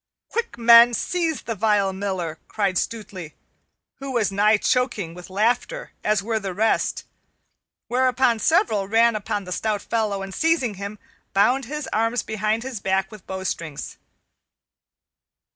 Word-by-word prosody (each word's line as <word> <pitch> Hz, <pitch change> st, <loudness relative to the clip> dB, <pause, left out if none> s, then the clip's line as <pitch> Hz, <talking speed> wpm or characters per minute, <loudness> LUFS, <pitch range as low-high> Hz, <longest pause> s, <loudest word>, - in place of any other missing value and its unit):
"Quick, 460 Hz, -, -3 dB
men, 235 Hz, 0 st, +7 dB
seize 335 Hz, +1 st, -1 dB
the 230 Hz, -, -3 dB
vile 205 Hz, -2 st, +1 dB
Miller!" 185 Hz, -5 st, -3 dB
cried 195 Hz, -4 st, 0 dB
Stutely, 195 Hz, -8 st, -6 dB, 0.6 s
who 275 Hz, 0 st, -6 dB
was 230 Hz, -6 st, +1 dB
nigh 210 Hz, +2 st, +4 dB
choking 205 Hz, -7 st, 0 dB
with 180 Hz, +1 st, -11 dB
laughter 240 Hz, -, -1 dB
as 210 Hz, -2 st, +1 dB
were 225 Hz, +1 st, -1 dB
the 195 Hz, -3 st, -5 dB
rest; 220 Hz, +3 st, +1 dB, 0.8 s
whereupon 255 Hz, -1 st, +2 dB
several 220 Hz, -, +2 dB
ran 230 Hz, +2 st, +4 dB
upon 205 Hz, -1 st, -3 dB
the 180 Hz, -, -9 dB
stout 210 Hz, +2 st, -1 dB
fellow 210 Hz, -4 st, -1 dB
and 195 Hz, 0 st, -7 dB
seizing 315 Hz, -, +1 dB
him, 200 Hz, +2 st, -7 dB, 0.4 s
bound 245 Hz, +7 st, +3 dB
his 300 Hz, +3 st, -5 dB
arms 225 Hz, +2 st, +1 dB
behind 215 Hz, +1 st, -1 dB
his 255 Hz, -4 st, -5 dB
back 190 Hz, 0 st, 0 dB
with 215 Hz, -3 st, -13 dB
bowstrings. 170 Hz, -5 st, -5 dB
215 Hz, 140 wpm, -23 LUFS, 195-240 Hz, 0.8 s, men